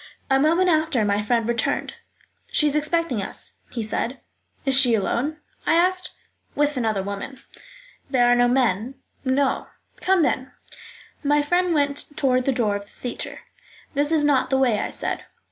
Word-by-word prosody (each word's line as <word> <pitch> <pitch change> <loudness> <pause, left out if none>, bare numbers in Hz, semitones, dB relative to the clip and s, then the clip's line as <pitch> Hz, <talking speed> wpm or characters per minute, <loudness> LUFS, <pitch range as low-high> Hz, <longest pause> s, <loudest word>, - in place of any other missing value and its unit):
A 270 - +5
moment 335 +6 +3
after 310 -9 +2
my 205 0 +1
friend 230 +1 0
returned. 235 -1 -1 0.6
"She 300 - +3
is 295 -1 +1
expecting 305 -6 0
us," 195 - -5
he 230 - -4
said. 235 +4 -2 0.5
"Is 270 -1 +3
she 255 -4 +5
alone?" 245 +9 -1 0.3
I - - +4
asked. 365 +2 +2 0.5
"With 295 0 +1
another 220 -6 0
woman." 200 +7 -6 0.7
"There 255 -3 +3
are 245 0 +5
no 245 0 +4
men?" 245 -1 +1 0.3
"No." 265 +1 +1 0.3
"Come, 375 -2 +2
then." 260 -2 -1 0.7
My 290 0 +3
friend 355 +4 +1
went 285 -1 0
toward 255 -2 +2
the 275 - +3
door 225 -5 +1
of 200 0 -5
the - - -24
theatre. 245 - -6 0.5
"That 290 +1 +2
is 315 -2 +3
not 270 -3 +2
the 265 - +2
way," 245 -6 +2
I - - -2
said. - - -3
265 Hz, 165 wpm, -23 LUFS, 235-295 Hz, 0.7 s, A